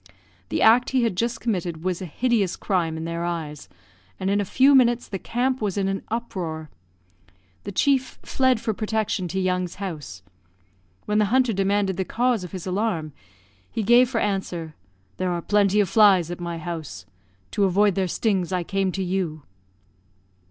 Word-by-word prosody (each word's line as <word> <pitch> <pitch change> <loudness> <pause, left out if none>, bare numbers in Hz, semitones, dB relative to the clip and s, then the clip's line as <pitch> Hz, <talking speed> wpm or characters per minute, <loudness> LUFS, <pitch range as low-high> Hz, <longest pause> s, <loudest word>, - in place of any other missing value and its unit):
The - - 0
act 235 +3 +5
he 260 -2 +2
had 225 -5 0
just 235 +5 -1
committed 175 -7 -2
was 185 -1 -2
a 185 - -5
hideous 215 - 0
crime 170 -5 -1
in 160 - -5
their 170 0 -3
eyes, 160 - -4 0.5
and 190 +1 0
in 205 +1 +2
a - - -2
few 265 +8 +4
minutes 240 -2 +4
the 195 - -5
camp 250 +4 -1
was 205 -2 -1
in 195 -1 +1
an 195 0 -2
uproar. 175 -9 -4 0.9
The 200 - -4
chief 260 +5 +1
fled 260 -3 +2
for 220 - -2
protection 215 -3 -1
to 190 +3 -3
Young's 180 -1 -1
house. 155 - -7 0.8
When 210 0 +1
the 210 - +4
hunter 250 +2 +2
demanded 195 -1 +1
the 190 - 0
cause 240 0 0
of 180 - -8
his 185 -3 -6
alarm, 185 -6 -2 0.6
he 220 - -2
gave 240 +3 +5
for 250 - -2
answer, 180 -6 -2 0.4
"There 185 -1 -1
are 175 - -1
plenty 205 +2 +2
of 205 - +3
flies 190 -4 +5
at 175 - -6
my 170 -1 -4
house. 160 - -6 0.5
To 200 - +2
avoid 200 +2 +3
their 190 0 0
stings 190 -1 0
I 180 -1 0
came 195 +1 -1
to 195 - -2
you." 175 -5 -2
195 Hz, 180 wpm, -24 LUFS, 175-220 Hz, 0.9 s, act